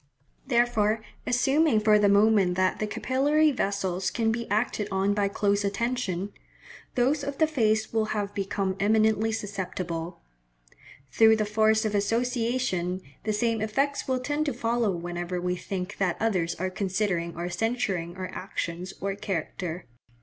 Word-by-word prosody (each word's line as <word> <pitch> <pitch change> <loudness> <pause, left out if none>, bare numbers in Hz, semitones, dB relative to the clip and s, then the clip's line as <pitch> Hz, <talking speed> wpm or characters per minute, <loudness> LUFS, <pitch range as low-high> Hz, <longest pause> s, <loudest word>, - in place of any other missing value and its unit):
Therefore, 230 -4 +2 0.2
assuming 270 +1 +3
for 210 0 +4
the 205 -1 +4
moment 200 -3 +4
that 185 0 +1
the 215 - -1
capillary 290 +7 +2
vessels 195 -6 -1
can 225 -1 0
be 235 +1 -3
acted 210 -1 0
on 195 +1 +1
by 205 -1 +1
close 200 0 +1
attention, 200 -2 -2 0.6
those 275 +4 +2
of 280 0 -4
the 315 - +4
face 220 -8 +1
will 220 -1 +2
have 205 -2 -3
become 195 -1 -2
eminently 220 +1 +3
susceptible. 185 -5 -4 0.9
Through 220 0 +6
the 215 -1 0
force 220 +1 +2
of 215 - -1
association, 230 -4 0 0.3
the 215 - +1
same 225 0 0
effects 275 +6 0
will 260 -1 +1
tend 290 +4 -1
to 285 - 0
follow 230 -1 0
whenever 175 0 -3
we 180 0 -1
think 185 +1 -5
that 185 -3 +1
others 185 -7 0
are 185 +1 -3
considering 185 -3 -1
or 170 +1 -3
censuring 190 -4 -1
our 185 -1 -5
actions 180 -1 -5
or 195 0 -1
character. 180 -3 -4
210 Hz, 150 wpm, -27 LUFS, 185-230 Hz, 0.9 s, Through